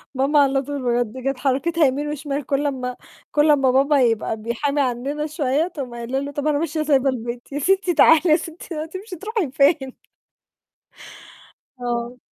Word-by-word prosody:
ماما 275 +3 +3
على 270 -1 +3
طول 285 +1 -5 0.2
بجد، 245 +3 -10
كانت 270 -1 -1
حركتها 300 +5 +1
يمين 285 +2 0
وشمال، 290 -1 -4
كلّ 285 +2 0
أمّا 250 -3 -3 0.4
كلّ 300 +1 +4
أمّا 270 -3 +3
بابا 280 +2 +3
يبقى 225 -2 +1
بيحامي 260 +6 -1
عننا 270 +4 -2
شوية، 300 0 0
تقوم 275 -8 -7
قايلة 240 +3 -3
له: 280 +1 -5
"طب 285 +1 -3
أنا 295 -1 +2
ماشية 325 0 -2
وسايبة 280 -3 +2
البيت!" 240 0 -5
"يا 285 - -3
ستي 375 +3 +2
تعالي 320 -1 +6
يا 305 - +7
ستي، 330 +1 -6
هتمشي 375 +4 -8
تروحي 410 - -3
فين؟" 275 -2 +2 1.9
آه. 240 0 -3
280 Hz, 165 wpm, -22 LUFS, 255-305 Hz, 1.9 s, يا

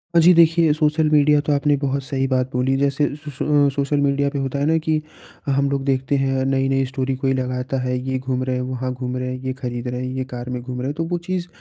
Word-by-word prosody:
अ, - - +7
जी, 175 +2 +7
देखिए, 165 -1 +5
social 155 0 +2
media 150 0 +4
तो 150 - +2
आपने 145 +1 +2
बहुत 140 0 -1
सही 135 0 -1
बात 130 -1 0
बोली। 125 +2 +1
जैसे 140 +1 +1
स 150 0 -10
सो 145 0 +3
सोशल 140 +1 0
मीडिया 140 0 +2
पे 140 0 -3
होता 135 +1 -2
है 140 - +1
ना 160 +1 +3
कि 155 -1 0 0.5
अ, - - +1
हम 140 +1 +2
लोग 140 -1 -1
देखते 135 0 0
हैं 135 -1 +1
नई-नई 135 0 +1
स्टोरी 130 0 -2
कोई 135 0 +2
लगाता 130 0 -2
है, 125 0 -1
ये 130 - 0
घूम 130 0 -2
रहे 130 0 -1
हैं, 125 - -1
वहाँ 130 0 -3
घूम 125 0 -4
रहे 125 0 -3
हैं, 130 - -4
ये 130 - -1
खरीद 125 -2 -5
रहे 125 0 -3
हैं, 130 0 -4
ये 130 - -1
कार 125 +1 -6
में 125 -1 -3
घूम 125 0 -6
रहे 130 - -2
हैं। 145 - -2
तो 165 - 0
वो 175 - +1
चीज़ 175 0 -3
135 Hz, 270 wpm, -21 LUFS, 130-145 Hz, 0.5 s, अ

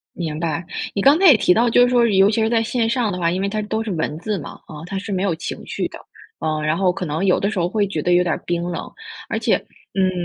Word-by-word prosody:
明 160 -3 -4
白， 165 0 -2 0.3
你 200 - -1
刚 280 +9 +5
才 385 - +4
也 275 - +8
提 180 -4 +3
到， 235 +1 +3
就 245 - +5
是 245 - +5
说 245 -1 +4
尤 195 -1 +4
其 220 +1 0
是 220 - +1
在 230 -1 +2
线 230 0 0
上 235 -2 0
的 180 - -4
话， 170 -1 +1
因 185 +2 -2
为 200 - 0
它 215 +1 -2
都 220 +1 -2
是 225 - -5
文 155 -2 -2
字 205 +3 -3
嘛， 155 - -8
啊， 150 -1 -10
它 195 +2 -4
是 205 +2 -7
没 190 -1 -1
有 195 -4 +1
情 160 - -6
绪 - - -3
的。 - - -11 0.4
呃， 155 -1 -2
然 155 +2 +1
后 185 -1 +2
可 180 -1 -5
能 155 +5 -2
有 185 - +3
的 200 - 0
时 210 - -4
候 175 0 +1
会 205 +2 0
觉 165 -6 -3
得 175 - +1
有 175 - +5
点 175 -2 0
儿 - - -5
冰 170 0 -1
冷。 175 -1 -5 0.4
而 - - 0
且， - - +2 0.4
嗯， 190 -1 +2
195 Hz, 320 characters per minute, -20 LUFS, 170-220 Hz, 0.4 s, 也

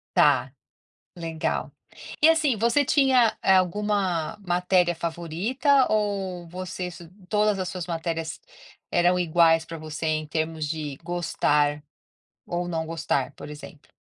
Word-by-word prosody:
Tá, 135 -3 +4 0.7
legal. 165 -1 -2 0.5
E, 310 - +7
assim, 315 -6 +3
você 235 +7 +2
tinha, 260 -5 +3
eh, 190 - +5
alguma 185 -2 0
matéria 180 0 +2
favorita 185 - +1
ou 195 -5 -1
você 180 +1 -5
es 175 - -9 0.3
todas 210 -2 +2
as 185 - -2
suas 180 -2 -5
matérias 165 -2 -3 0.5
eram 175 +1 +3
iguais 165 -1 +4
para 165 - -7
você 155 0 -6
em 155 0 0
termos 160 0 -2
de 150 -3 -4
gostar 150 -4 0 0.6
ou 175 0 -2
não 160 -2 -2
gostar, 150 -5 -1
por - - -9
exemplo? 150 0 -12
175 Hz, 130 wpm, -25 LUFS, 160-195 Hz, 0.7 s, E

